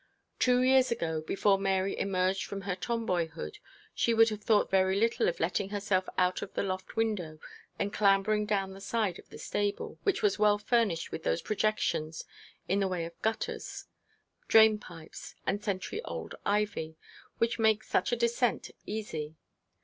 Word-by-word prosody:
Two 250 Hz, 0 st, +4 dB
years 260 Hz, 0 st, +5 dB
ago, 165 Hz, -9 st, -1 dB
before 195 Hz, +4 st, +2 dB
Mary 195 Hz, 0 st, 0 dB
emerged 190 Hz, 0 st, 0 dB
from 200 Hz, 0 st, -6 dB
her 190 Hz, -1 st, -2 dB
Tomboyhood, 180 Hz, -, -2 dB, 0.3 s
she 235 Hz, -, +1 dB
would 225 Hz, 0 st, +6 dB
have 215 Hz, -1 st, -5 dB
thought 210 Hz, -1 st, +2 dB
very 190 Hz, 0 st, +3 dB
little 230 Hz, +1 st, +2 dB
of 175 Hz, -, -5 dB
letting 185 Hz, +4 st, 0 dB
herself 200 Hz, -2 st, 0 dB
out 180 Hz, 0 st, +2 dB
of -, -, -6 dB
the -, -, 0 dB
loft 185 Hz, -1 st, -4 dB
window 205 Hz, -9 st, -1 dB, 0.4 s
and 200 Hz, -, -2 dB
clambering 210 Hz, +1 st, +3 dB
down 195 Hz, -2 st, 0 dB
the 195 Hz, -, -11 dB
side 205 Hz, -4 st, -1 dB
of -, -, -16 dB
the -, -, -10 dB
stable, 205 Hz, 0 st, -3 dB
which 395 Hz, +1 st, 0 dB
was 410 Hz, -, +2 dB
well 210 Hz, -1 st, +5 dB
furnished 210 Hz, -5 st, 0 dB
with -, -, -5 dB
those 80 Hz, -, -1 dB
projections 210 Hz, -7 st, -1 dB, 0.4 s
in 195 Hz, +2 st, +1 dB
the 195 Hz, -, +2 dB
way 180 Hz, -3 st, -2 dB
of 170 Hz, 0 st, -11 dB
gutters, 220 Hz, 0 st, -3 dB, 0.6 s
drain 220 Hz, -1 st, +6 dB
pipes, 165 Hz, -5 st, -11 dB
and 205 Hz, +1 st, -1 dB
century 200 Hz, -, -3 dB
old -, -, -6 dB
ivy, 200 Hz, -6 st, -1 dB, 0.4 s
which 230 Hz, 0 st, 0 dB
make 220 Hz, -1 st, +3 dB
such -, -, 0 dB
a -, -, +3 dB
descent 235 Hz, 0 st, 0 dB, 0.2 s
easy. 160 Hz, -8 st, -4 dB
200 Hz, 165 wpm, -30 LUFS, 185-220 Hz, 0.6 s, would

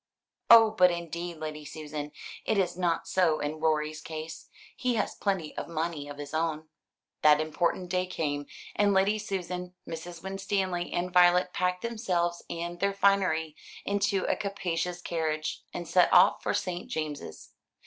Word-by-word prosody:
"Oh, 225 Hz, -2 st, +9 dB
but 185 Hz, -4 st, +5 dB
indeed, 170 Hz, 0 st, -4 dB
Lady 155 Hz, -1 st, -6 dB
Susan, 150 Hz, -1 st, -6 dB, 0.3 s
it 220 Hz, -, 0 dB
is 180 Hz, -3 st, +1 dB
not 175 Hz, -2 st, 0 dB
so 170 Hz, -5 st, +2 dB
in 150 Hz, +2 st, -3 dB
Rorie's 155 Hz, 0 st, 0 dB
case. 160 Hz, 0 st, -7 dB, 0.3 s
He 250 Hz, -2 st, 0 dB
has 215 Hz, -, 0 dB
plenty 190 Hz, -7 st, -2 dB
of -, -, -4 dB
money 160 Hz, -3 st, -3 dB
of 145 Hz, -, -8 dB
his 145 Hz, 0 st, -7 dB
own." 160 Hz, -1 st, -1 dB, 0.5 s
The 150 Hz, -1 st, +6 dB
important 170 Hz, +3 st, -1 dB
day 185 Hz, 0 st, 0 dB
came; 145 Hz, -5 st, -2 dB, 0.3 s
and 205 Hz, -1 st, +3 dB
Lady 200 Hz, +3 st, +3 dB
Susan, 180 Hz, -3 st, -4 dB
Mrs. 165 Hz, +1 st, -7 dB
Winstanley, 190 Hz, -2 st, -2 dB
and 180 Hz, +1 st, -2 dB
Violet 180 Hz, 0 st, +5 dB
packed 180 Hz, 0 st, 0 dB
themselves 180 Hz, -7 st, -1 dB
and 170 Hz, +1 st, -4 dB
their 200 Hz, 0 st, +1 dB
finery 185 Hz, -6 st, +2 dB, 0.3 s
into 200 Hz, -1 st, +1 dB
a -, -, +1 dB
capacious 180 Hz, -3 st, -3 dB
carriage, 155 Hz, -2 st, -2 dB
and 175 Hz, -1 st, -6 dB
set 180 Hz, +2 st, +4 dB
off 180 Hz, -, +6 dB
for -, -, 0 dB
St. 180 Hz, -1 st, -3 dB
James's. 150 Hz, -, -5 dB
175 Hz, 155 wpm, -29 LUFS, 155-190 Hz, 0.5 s, Oh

